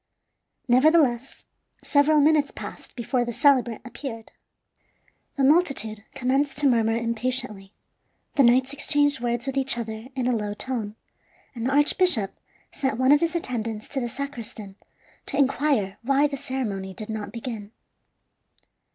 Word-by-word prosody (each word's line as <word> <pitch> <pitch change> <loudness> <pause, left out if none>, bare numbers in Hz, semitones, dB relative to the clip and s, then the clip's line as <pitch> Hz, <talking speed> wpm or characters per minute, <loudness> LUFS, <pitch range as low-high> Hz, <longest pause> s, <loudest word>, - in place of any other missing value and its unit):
Nevertheless, 260 -1 +2 0.4
several 300 +1 +3
minutes 300 -1 +3
passed - - -10
before 245 +1 -1
the 240 - -4
celebrant 255 -3 +2
appeared. 245 -2 -7 1.1
The 275 - +1
multitude 265 -8 +2
commenced 270 +2 0
to 290 0 +3
murmur 225 -3 +2
impatiently; 230 -3 -2 0.6
the 285 - +3
knights 260 +2 +4
exchanged 290 -1 +2
words 240 0 -2
with 270 0 -3
each 270 -2 +2
other 220 0 -6
in 255 -2 -2
a 250 -1 +1
low 210 -2 -3
tone; 220 -4 -3 0.6
and 235 -1 -3
the - - 0
archbishop 290 - +3 0.4
sent 265 -6 -2
one 260 +2 +3
of 290 - +6
his 335 +1 -1
attendants 230 -8 -3
to 275 - -2
the 240 -2 -3
sacristan 235 -6 -7 0.5
to 280 - -3
inquire 270 -7 +1
why 275 +4 +2
the 290 -1 -1
ceremony 210 -8 -4
did 215 - -8
not 210 -2 -5
begin. 225 -3 -6
255 Hz, 140 wpm, -24 LUFS, 225-280 Hz, 1.1 s, of